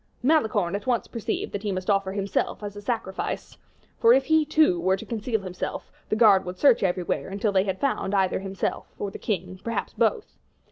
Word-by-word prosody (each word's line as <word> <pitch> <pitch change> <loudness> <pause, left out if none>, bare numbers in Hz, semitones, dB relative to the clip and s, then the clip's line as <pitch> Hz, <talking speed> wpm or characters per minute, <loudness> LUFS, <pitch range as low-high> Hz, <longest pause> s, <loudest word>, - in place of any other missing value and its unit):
Malicorne 220 - +2
at 205 +4 -5
once 245 -2 +1
perceived 230 -3 -3
that 205 - -4
he 205 -1 -2
must 185 -1 -4
offer 195 -2 +1
himself 200 +1 -2
as 205 -1 -6
a 205 - -8
sacrifice; 205 -3 -3 0.4
for 230 - +7
if 265 +1 +3
he, 315 +1 +4
too, 305 - +3
were 185 +2 +2
to - - -9
conceal 225 -1 -2
himself, 185 -2 -5 0.2
the - - +1
guard 210 -4 +6
would 180 0 -6
search 265 0 +5
everywhere 180 -1 -1
until 200 +2 -1
they 190 0 +2
had 190 -1 -2
found 260 -7 0
either 190 -2 +2
himself 195 0 -4
or 200 - -4
the - - -8
king, 185 -2 -3
perhaps 230 - -3
both. 455 -3 0
205 Hz, 200 wpm, -25 LUFS, 190-230 Hz, 0.4 s, for